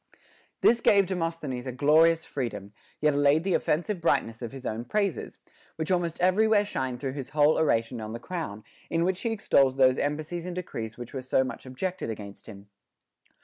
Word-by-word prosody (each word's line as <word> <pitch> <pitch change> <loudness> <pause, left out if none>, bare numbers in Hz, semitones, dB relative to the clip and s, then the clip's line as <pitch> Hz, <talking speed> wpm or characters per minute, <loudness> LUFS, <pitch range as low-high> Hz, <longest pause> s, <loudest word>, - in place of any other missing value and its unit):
This 235 0 +4
gave 200 -1 +5
Demosthenes 165 -8 -3
a - - -2
glorious 160 +5 +4
freedom, 115 -7 -5 0.3
yet 150 -1 +3
allayed 145 +2 +3
the 190 -1 0
offensive 175 +5 0
brightness 130 -8 0
of 120 - -5
his 135 -1 -10
own 110 +2 -3
praises, 200 +4 -2 0.4
which 160 +2 -3
almost 175 -2 0
everywhere 205 +3 +3
shine 130 -10 -3
through 130 +1 -4
his 135 -2 -6
whole 150 +1 +4
Oration 115 -5 +1
on 110 0 -6
the 115 - -5
Crown, 125 - -5 0.3
in 165 0 +1
which 185 +1 0
he 230 - -1
extols 140 -11 +3
those 130 -1 +4
embassies 155 +4 -3
and 180 - -5
decrees 115 -11 -5
which 120 -1 -9
were 135 - -4
so 130 +1 +2
much 130 - -7
objected 180 +6 -4
against 100 -2 -8
him. 100 -2 -11
145 Hz, 185 wpm, -27 LUFS, 125-175 Hz, 0.4 s, gave